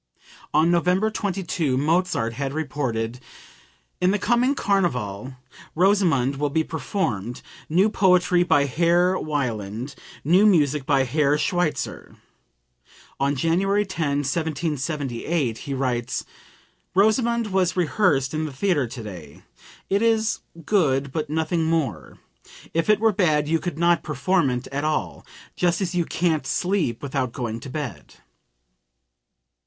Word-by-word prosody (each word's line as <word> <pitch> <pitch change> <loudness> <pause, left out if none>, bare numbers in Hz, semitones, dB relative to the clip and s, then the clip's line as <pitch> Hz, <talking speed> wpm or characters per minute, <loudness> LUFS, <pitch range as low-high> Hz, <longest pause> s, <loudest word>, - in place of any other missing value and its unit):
On 165 +2 +3
November 180 +5 +2
22, 175 -9 -1
Mozart 155 -5 +1
had 135 +2 -3
reported: 125 -6 -3 0.8
"In 180 - +4
the 205 - +2
coming 240 +6 +2
carnival 130 - -1 0.4
'Rosamunde' 170 -9 +3
will 145 +1 0
be 160 +3 +1
performed 130 - -3 0.3
new 180 +6 +4
poetry 180 -4 +3
by 145 -5 +3
Herr 170 +6 +2
Wieland, 120 -4 -3 0.3
new 185 +8 +5
music 150 -7 +2
by 135 -2 +3
Herr 145 +3 +2
Schweitzer." 175 +1 -2 1.0
On 140 +1 +1
January 195 +8 +1
10, 150 -7 -1
1778, 145 -3 -2
he 140 - -5
writes: 125 -2 -2 0.7
"'Rosamunde' 225 +2 +2
was 185 -1 +1
rehearsed 155 -6 +1
in 155 0 -1
the 155 - -5
theatre 145 -2 0
today; 100 - -9 0.4
it 200 +2 +1
is 225 -1 +2 0.3
good, 140 -9 +1
but 155 +1 -3
nothing 160 +1 0
more. 155 - -2 0.6
If 165 +4 0
it 215 -1 +5
were 225 0 +3
bad 155 -6 +2
you 165 +1 +1
could 175 -4 -4
not 170 +1 +3
perform 155 +2 +1
it 125 0 -3
at 140 +2 -2
all; 95 - -2 0.3
just 175 -1 +1
as 185 -3 -2
you 175 -2 +1
can't 160 -5 0
sleep 175 - -1
without 130 -3 -2
going 115 -3 -4
to 135 - -9
bed!") 125 - -6
155 Hz, 125 wpm, -23 LUFS, 135-180 Hz, 1.0 s, new